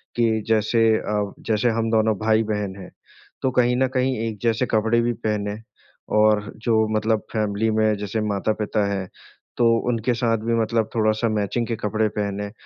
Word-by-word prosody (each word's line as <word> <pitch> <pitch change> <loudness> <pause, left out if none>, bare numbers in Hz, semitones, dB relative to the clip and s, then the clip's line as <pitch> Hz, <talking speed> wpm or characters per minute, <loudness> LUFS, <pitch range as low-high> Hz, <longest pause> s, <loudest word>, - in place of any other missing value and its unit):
कि 115 -2 +1
जैसे 110 +1 +2
अ, 105 -2 -2
जैसे 110 +2 0
हम 115 0 0
दोनों 110 -1 +2
भाई-बहन 110 -3 0
हैं 95 - -11 0.5
तो 130 - +1
कहीं 125 -1 +2
न 130 +1 +2
कहीं 130 0 +1
एक 110 -2 -5
जैसे 115 +1 +1
कपड़े 110 +2 +2
भी 120 0 0
पहनें 105 -2 -3 0.6
और 105 -1 +3
जो 110 -2 +3
मतलब 110 0 +1
फ़ेमिली 105 0 0
में 110 -1 +3
जैसे 105 +2 -3
माता-पिता 105 0 -1
हैं 95 -2 -3 0.5
तो 120 - +3 0.2
उनके 120 +1 0
साथ 115 -1 +1
भी 115 +2 -2
मतलब 115 -1 0
थोड़ा-सा 110 +1 +1
मैचिंग 110 +2 -1
के 115 - -2
कपड़े 110 0 0
पहनें। 100 0 -2
110 Hz, 165 wpm, -23 LUFS, 105-115 Hz, 0.6 s, और